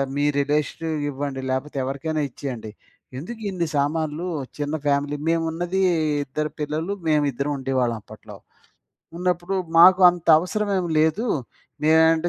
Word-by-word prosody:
మీ 145 - 0 0.2
relation 150 +3 -1 0.2
ఇవ్వండి 140 -1 -4
లేపోతే 135 +2 -3
ఎవరికైనా 150 +4 -2
ఇచ్చేయండి. 120 -5 -6 0.5
ఎందుకు 220 - -7
ఇన్ని 175 -3 -2
సామాన్లు 155 +3 -1 0.3
చిన్న 145 +1 -2
ఫ్యామిలీ. 145 +1 +1
మేమున్నది 165 +3 0 0.4
ఇద్దరు 150 +3 -3
పిల్లలు. 155 +6 -2
మేము 150 -1 +3
ఇద్దరం 140 +4 -2
ఉండేవాళ్ళం 130 -3 0
అప్పట్లో. 105 0 -13 0.8
ఉన్నప్పుడు 180 +1 -1 0.2
మాకు 185 +2 +8
అంత 175 -1 -9
అవసరమేం 195 0 -1
లేదు. 160 +10 +1 0.6
నేనంటే 160 +1 +4
155 Hz, 115 wpm, -23 LUFS, 140-170 Hz, 0.8 s, మాకు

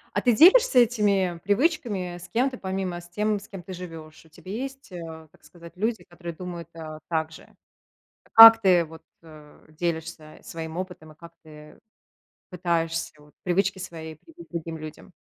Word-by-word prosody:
А - - +2
ты 245 - +3
делишься 335 - +7
этими 200 -7 +1
привычками 205 - 0
с 175 - -12
кем-то, 255 +2 0
помимо, 190 -2 -4
с 175 - -15
тем, 210 +3 -1
с 205 - -15
кем 190 -3 -9
ты 185 - -9
живешь? 165 -3 -10
У - - -20
тебя 185 +4 -11
есть, 270 0 -7
э, 160 -2 -9
так - - -25
сказать 170 -2 -14
люди, 220 +4 -2
которые 170 -1 -9
думают, 175 -1 -8
а, 155 -1 -8
так 160 -1 -1
же? - - -14 0.8
Как 225 0 +11
ты 180 -4 +4
вот, 160 0 -13 0.2
э, 155 -2 -16
делишься 160 -1 -5
своим 160 0 -7
опытом 180 -4 -7
и - - -21
как 170 +1 -13
ты 150 -1 -14 0.7
пытаешься 165 -2 -1
вот 150 0 -21
привычки 190 +2 +1
свои 165 -4 -8
привить 330 - -16
другим 165 -1 -5
людям? 155 +3 -10
175 Hz, 170 wpm, -25 LUFS, 160-205 Hz, 0.8 s, Как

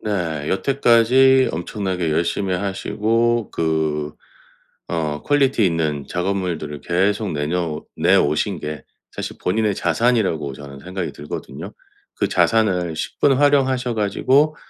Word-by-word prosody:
네 85 -8 -2
여태까지 130 +2 +4
엄청나게 90 0 -2
열심히 90 +4 0
하시고 110 +4 0
그 80 -2 -1 0.8
어 75 -3 -2
퀄리티 135 -7 +2
있는 80 -4 -1
작업물들을 90 -5 -2
계속 100 +3 0
내녀 75 +1 -2
내 90 +5 +4
오신 75 -3 +1
게 75 0 -5 0.3
사실 - - -6
본인의 105 +2 0
자산이라고 95 - 0
저는 70 -1 -10
생각이 90 +1 -5
들거든요. 75 - -7 0.4
그 - - 0
자산을 90 -7 +1
십분 135 - +1
활용하셔 130 -3 +2
가지고 135 +9 +2
95 Hz, 275 characters per minute, -21 LUFS, 80-115 Hz, 0.8 s, 여태까지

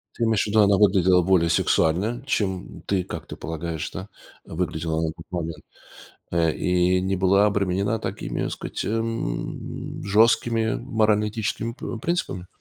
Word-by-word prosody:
Ты 120 - -2
имеешь 110 -2 +2
ввиду, 110 +1 +2
она 100 -1 +5
выглядела 95 -3 +5
более 85 -2 +3
сексуально, 95 +9 +2
чем, 95 -9 -1
м, - - -15
ты, 95 -2 0
как - - -7
ты - - -7
полагаешь, 80 0 -4
да, 95 +3 -7 0.3
выглядела 80 -1 -2
на 80 - 0
тот 80 0 -13
момент, 80 -3 -4 0.7
э, 85 -2 +2
и 90 0 +2
не 95 +1 0
была 95 +2 +4
обременена 100 +1 0
такими, - - -4
так - - -2
сказать, - - -5
м, 115 - -3
жесткими 110 +2 +3
морально-этическими, 110 -1 0
э, - - -15
пр 120 -4 -6
принципами? 165 - -2
95 Hz, 150 wpm, -24 LUFS, 85-110 Hz, 0.7 s, она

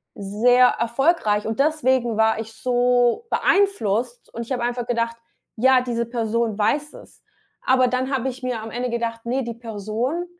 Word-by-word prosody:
sehr 240 +6 +3
erfolgreich, 235 -2 +1
und 220 +2 -3
deswegen 260 -6 +1
war 220 0 +2
ich 225 0 -7
so 245 - +1
beeinflusst, 245 - 0
und 235 - -5
ich 235 - -12
habe 245 -2 -2
einfach 245 0 -2
gedacht, 230 -1 -1 0.4
ja, 260 +2 +4
diese 235 -2 -2
Person 230 -2 -1
weiß 285 +8 0
es. - - -15 0.4
Aber 255 -1 +3
dann 255 +2 -1
habe 265 0 0
ich 260 0 -9
mir 245 -3 -2
am 220 0 -8
Ende 245 +2 -3
gedacht, 230 -1 -3
ne, 255 +3 -1
die 235 - -5
Person, 230 - -3
240 Hz, 165 wpm, -22 LUFS, 225-255 Hz, 0.4 s, ja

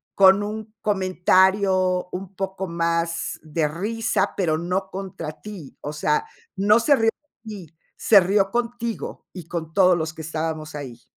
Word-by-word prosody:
con 195 +1 +6
un 215 +1 -6
comentario 185 -1 +2
un 190 +1 -7
poco 190 0 -4
más 170 0 -1
de 155 0 0
risa, 210 +8 -1
pero 160 -5 +1
no 185 +3 -2
contra 185 -5 -6
ti. 195 -10 -9
O 145 - -4
sea, 435 - 0 0.3
no 210 +4 +4
se 285 +5 +4
río 225 -3 +3 0.4
de 220 - -8 0.2
ti, 160 - -32 0.2
se 210 - +6
rio 195 +1 +2
contigo 235 -1 -3
y 175 -4 -9
con 160 -2 -5
todos 185 -3 +5
los 160 -1 -3
que 160 - -9
estábamos 155 -1 -4
ahí. 125 -5 -8
185 Hz, 155 wpm, -23 LUFS, 165-205 Hz, 0.4 s, con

